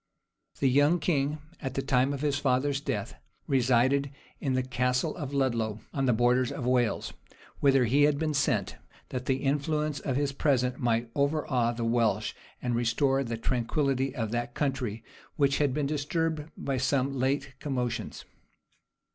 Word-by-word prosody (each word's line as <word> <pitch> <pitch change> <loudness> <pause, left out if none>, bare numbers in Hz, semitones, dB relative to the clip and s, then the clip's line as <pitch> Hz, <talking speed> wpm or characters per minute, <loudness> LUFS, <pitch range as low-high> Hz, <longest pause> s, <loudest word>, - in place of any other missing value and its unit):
The 135 - +3
young 145 +6 +4
king, 150 -2 0 0.2
at 135 -2 -4
the 135 - -1
time 135 0 +2
of 140 -1 -4
his 145 -2 +1
father's 140 +1 +1
death, - - -3 0.3
resided 130 +2 +2 0.3
in 135 -3 -1
the 130 0 +1
Castle 125 +3 0
of 145 -6 -5
Ludlow, 115 -6 0
on 135 -1 0
the - - +5
borders 120 +2 +2
of 125 - -4
Wales; 125 -2 +1 0.5
whither 135 -2 +4
he 140 +5 +4
had 145 -1 +2
been 155 0 -1
sent, 135 - 0 0.3
that 125 -1 -5
the 130 0 0
influence 150 +1 0
of 135 -2 -2
his 140 0 +1
presence 125 -3 +1
might 115 -1 0
overawe 140 -4 +1
the 115 0 -3
Welsh, 115 -3 +1 0.3
and 125 -1 0
restore 125 +4 +2
the 115 -2 -4
tranquillity 130 +3 0
of 115 -5 -2
that 120 0 -3
country, 125 -6 -2 0.3
which 140 -1 +2
had 145 -2 +2
been 145 +2 -1
disturbed 155 +2 -1
by 135 -1 -2
some 135 +1 0
late 135 +1 0
commotions. 125 -4 -3
135 Hz, 160 wpm, -28 LUFS, 125-145 Hz, 0.5 s, the